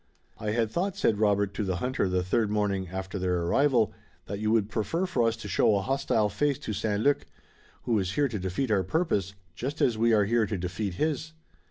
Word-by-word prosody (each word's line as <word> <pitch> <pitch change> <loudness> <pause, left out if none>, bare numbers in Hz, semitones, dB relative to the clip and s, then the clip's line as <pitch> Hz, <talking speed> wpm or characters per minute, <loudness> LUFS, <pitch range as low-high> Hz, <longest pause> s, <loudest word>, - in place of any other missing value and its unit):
"I 105 - -3
had 110 0 0
thought," 190 - -1
said 110 - +2
Robert 100 -2 +2
to 105 - -2
the 95 -2 -1
hunter 125 +1 -1
the 90 0 +1
third 105 +4 +1
morning 100 -3 0
after 95 +2 -5
their 90 -2 0
arrival, 120 +3 +2 0.3
"that 100 +1 -5
you 105 0 0
would 110 -2 +3
prefer 110 - -1
for 125 -11 +1
us 115 - +1
to 115 - -8
show 105 - +3
a 100 - +1
hostile 110 -3 +1
face 135 +7 0
to 110 - -5
St. 105 0 -1
Luc, 145 0 +2 0.6
who 115 -3 +1
is 95 -1 -2
here 145 +3 +2
to 110 -5 -4
defeat 95 +7 -2
our 100 -3 +3
purpose, 100 - -1 0.2
just 135 - -4
as 115 -3 +2
we 115 +1 +4
are 105 -2 +4
here 115 0 +2
to 105 -1 -2
defeat 90 +2 -3
his." 155 - -1
105 Hz, 220 wpm, -28 LUFS, 95-125 Hz, 0.6 s, we